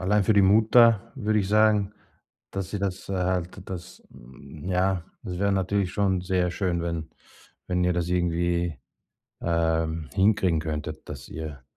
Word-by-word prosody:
allein 100 +2 +2
für 110 - +4
die 100 -1 +5
Mutter 110 +2 +5
würde 110 -4 0
ich 95 - -3
sagen, 105 -1 +3 0.6
dass 95 -1 -4
sie 105 - -3
das, 95 -1 -3
äh, - - -1
halt 90 0 -1
das 90 -1 -8 0.6
ja 95 -1 +1 0.2
es 90 - -5
wäre 100 0 +2
natürlich 95 0 0
schon 95 -3 +1
sehr 90 -1 0
schön, 85 -2 -1
wenn 85 -2 -3 0.6
wenn 90 0 0
ihr 90 0 +2
das 85 -1 -1
irgendwie, 85 -2 0 0.7
ähm, 80 -2 0
hinkriegen 95 -5 +3
könntet, 75 -1 -5
dass - - -8
ihr 75 -4 -7
90 Hz, 155 wpm, -26 LUFS, 85-100 Hz, 0.7 s, die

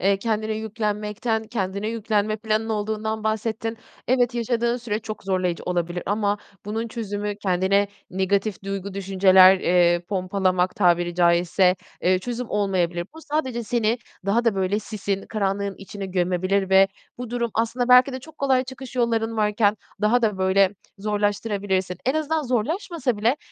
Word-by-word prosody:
eee, 195 +1 +3
kendine 220 0 -1
yüklenmekten, 215 0 -2
kendine 200 -2 -3
yüklenme 215 -1 0
planın 220 0 -1
olduğundan 220 0 -2
bahsettin. 220 +1 -2 0.3
Evet, 245 -1 +2
yaşadığın 235 0 0
süre 225 -4 -3
çok 215 -1 -7
zorlayıcı 185 -3 -1
olabilir 175 0 -2
ama 205 0 0 0.3
bunun 220 +3 -3
çözümü 205 -2 -4
kendine 195 0 +1 0.2
negatif 195 +2 0
duygu, 195 0 -4
düşünceler, 190 -1 +6
eee, 175 -1 +3
pompalamak 185 -1 0
tabiri 175 -4 +2
caizse, 175 +1 +3 0.3
eee, 185 +1 +3
çözüm 245 +4 -5
olmayabilir. 180 -4 0
Bu, 320 - -10
sadece 290 -6 -2
seni 230 0 0 0.3
daha 225 +5 +2
da 230 -3 +3
böyle 190 +1 0
sisin, 205 -2 -4
karanlığın 200 -1 -1
içine 195 0 -7
gömebilir 185 +1 0
ve 190 0 +6 0.3
bu 245 -2 -6
durum 240 -1 -1
aslında 240 +2 0
belki 250 +2 +7
de 260 - -5
çok 315 +3 -15
kolay 265 -2 +2
çıkış 260 -1 -9
yolların 230 -2 0
varken 210 0 +2 0.2
daha 225 +4 +3
da 210 -4 +1
böyle 190 +1 +3 0.2
zorlaştırabilirsin. 205 -2 -1
En 260 - +2
azından 315 0 0
zorlaşmasa 260 - -1
bile 225 +6 +2
210 Hz, 145 wpm, -23 LUFS, 190-230 Hz, 0.3 s, belki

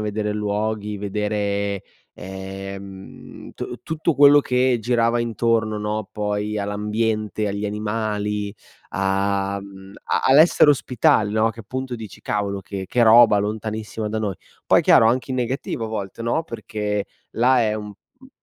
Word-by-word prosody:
vedere 105 0 -2
luoghi, 105 0 -2
vedere, 100 -1 -2 0.3
ehm 95 0 -9
tu - - -6
tutto 160 0 -1
quello 145 +1 +7
che 125 -2 +1
girava 120 0 +1
intorno, 115 -2 0
no, 105 0 -3
poi, 105 0 -2
all'ambiente, 105 +1 -1
agli 100 +1 -3
animali, 105 -1 -2 0.4
a, 100 +1 0
mhmm, 95 -1 -12
a - - 0
all'essere 150 +2 +6
ospitali, 115 -6 +2
no, 110 +1 +3
che 115 - -10
appunto 130 +4 -5
dici: 110 -4 -9
"Cavolo 100 -1 -2
che 95 +1 -6
che 120 - +1
roba 115 -1 +7
lontanissima 110 +1 -3
da 110 +1 -2
noi". 105 -3 -2 0.3
Poi - - +5
chiaro, 110 - +6
anche 125 +3 +1
in - - -2
negativo 125 -2 -2
a - - -4
volte, 110 0 -5
no, 120 +8 0
perché, 105 -6 -3 0.3
là 125 +2 +3
è 110 -2 +1
un 105 -1 -5 0.3
un 260 +1 -17
105 Hz, 145 wpm, -22 LUFS, 100-115 Hz, 0.4 s, quello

